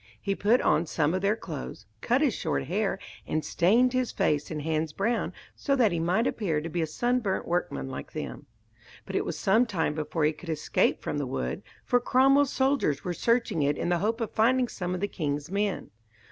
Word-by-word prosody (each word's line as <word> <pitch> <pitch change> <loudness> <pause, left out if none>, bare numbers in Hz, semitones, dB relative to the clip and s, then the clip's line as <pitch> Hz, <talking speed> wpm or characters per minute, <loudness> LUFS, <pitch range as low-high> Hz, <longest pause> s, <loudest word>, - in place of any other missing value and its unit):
He 200 - -1
put 215 +5 +3
on 165 - +2
some 155 0 +1
of 185 - -1
their 200 +2 +2
clothes, 150 - -7 0.2
cut 250 +4 +2
his 285 -7 +3
hair 160 - 0
short, 195 +6 -1 0.3
and 155 - -1
stained 235 +9 +3
his 255 -1 0
face 150 -1 0
and 150 -2 -4
hands 155 0 -1
brown 225 +6 0 0.2
so 275 - 0
that 235 -6 +3
he 170 - -1
might 180 +8 +1
appear 180 -12 0
to 160 +2 -5
be 170 +1 -2
a 160 - 0
sunburnt 240 +2 -1
workman 70 - -1
like - - -7
them. - - -6 0.6
But - - -6
it - - +1
was - - -3
some 225 +6 +3
time 170 -8 0
before 155 +1 -2
he 155 - +2
could 170 - -11
escape 155 -2 +1
from 145 - -2
the 140 - -2
wood, 65 - -3 0.2
for 245 - +3
Cromwell's 270 +3 +4
soldiers 265 - +1
were 180 - -2
searching 230 -5 +1
it 145 +1 +1
in - - -1
the 175 -1 +2
hope 225 +5 0
of 225 - -2
finding 250 +3 +3
some 180 -1 -3
of 180 - -5
the 205 - +1
king's 150 -3 -3
men. 200 0 -1
185 Hz, 215 wpm, -28 LUFS, 155-230 Hz, 0.6 s, Cromwell's